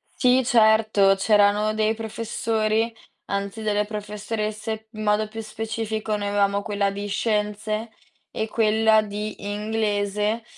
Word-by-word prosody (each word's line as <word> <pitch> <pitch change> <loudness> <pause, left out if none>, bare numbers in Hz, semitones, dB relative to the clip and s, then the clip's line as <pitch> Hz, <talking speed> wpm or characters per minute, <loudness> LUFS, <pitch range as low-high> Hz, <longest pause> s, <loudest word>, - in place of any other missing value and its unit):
Sì, 255 0 +4
certo, 220 -4 +4
c'erano 205 +1 +3
dei 215 0 +1
professori 225 0 -1 0.4
anzi 200 +2 -3
delle 210 -1 +1
professoresse, 215 +1 -4
in 215 0 -6
modo 210 +1 +2
più 225 +1 -7
specifico 220 0 -3
noi 205 -1 -3
avevamo 200 0 +1
quella 205 -1 0
di 200 +1 -5
scienze 215 +1 -1 0.4
e 220 - -2
quella 220 0 +3
di 210 0 -5 0.2
inglese 210 0 -1
215 Hz, 120 wpm, -24 LUFS, 205-220 Hz, 0.4 s, Sì